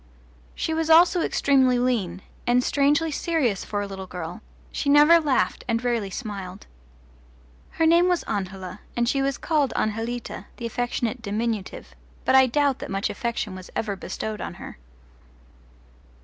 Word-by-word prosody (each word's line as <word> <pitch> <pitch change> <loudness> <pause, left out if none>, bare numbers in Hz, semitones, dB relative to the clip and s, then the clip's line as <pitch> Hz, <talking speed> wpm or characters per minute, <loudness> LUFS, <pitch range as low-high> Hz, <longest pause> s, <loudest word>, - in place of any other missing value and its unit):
She 320 - -2
was 320 0 -1
also 340 +2 +6
extremely 265 -5 +3
lean, 215 -8 -1 0.2
and 245 +1 +3
strangely 295 +4 +2
serious 285 - 0
for 205 -1 -3
a - - -2
little 190 -1 -7
girl: 180 +3 -7 0.3
she 285 - -2
never 295 +4 +7
laughed 290 -5 0
and 230 0 0
rarely 235 -5 0
smiled. 195 -3 -7 1.1
Her 325 - +1
name 340 +2 +5
was 355 -1 +1
Angela, 190 -1 -5 0.2
and 240 0 +2
she 275 +2 +1
was 275 -1 0
called 300 -5 0
Anjelita, 225 +2 -3
the 235 - -6
affectionate 245 0 -2
diminutive, 215 -1 -3 0.3
but - - +3
I 265 0 +7
doubt 280 +1 +1
that - - -7
much 195 +1 -1
affection 235 -5 -3
was 185 0 -9
ever 205 -3 -2
bestowed 215 +2 -5
on - - -5
her. - - -10
240 Hz, 150 wpm, -24 LUFS, 205-285 Hz, 1.1 s, never